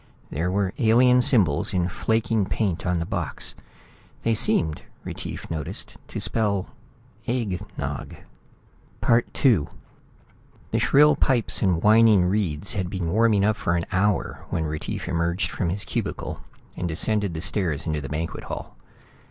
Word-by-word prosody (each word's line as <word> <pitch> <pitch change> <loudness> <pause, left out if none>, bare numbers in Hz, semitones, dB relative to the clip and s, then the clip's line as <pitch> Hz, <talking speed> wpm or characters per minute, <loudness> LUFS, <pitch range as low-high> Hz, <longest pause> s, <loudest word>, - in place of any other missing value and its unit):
There 85 +5 -1
were 95 0 0
alien 125 +2 +5
symbols 95 - +3
in 90 -1 +2
flaking 110 +1 0
paint 95 -4 -1
on 90 -1 +1
the 85 - -1
box. - - -3 0.7
They 115 - +2
seemed, 80 -7 +1 0.2
Retief - - -7
noticed, 80 -3 -5
to - - -5
spell 100 -4 -1 0.6
"egg 110 -7 -1 0.2
nog." - - -4 0.9
II 115 - +3 1.0
The - - +1
shrill 150 +2 +5
pipes 125 -6 +1
and 90 -4 +2
whining 110 -3 +6
reeds 95 -3 0
had 95 -4 -2
been 90 -3 -2
warming 110 -1 +3
up 110 0 +2
for 85 - 0
an 85 - 0
hour 100 +2 0
when 80 -2 -1
Retief 75 0 -4
emerged 85 +3 0
from 90 - -1
his 100 +3 -2
cubicle - - -3 0.3
and 90 - -2
descended 100 +2 0
the 80 - -3
stairs 85 -6 -1
to 75 -2 -2
the 70 - -6
banquet 80 +2 -4
hall. - - -7
95 Hz, 145 wpm, -24 LUFS, 85-110 Hz, 1.0 s, whining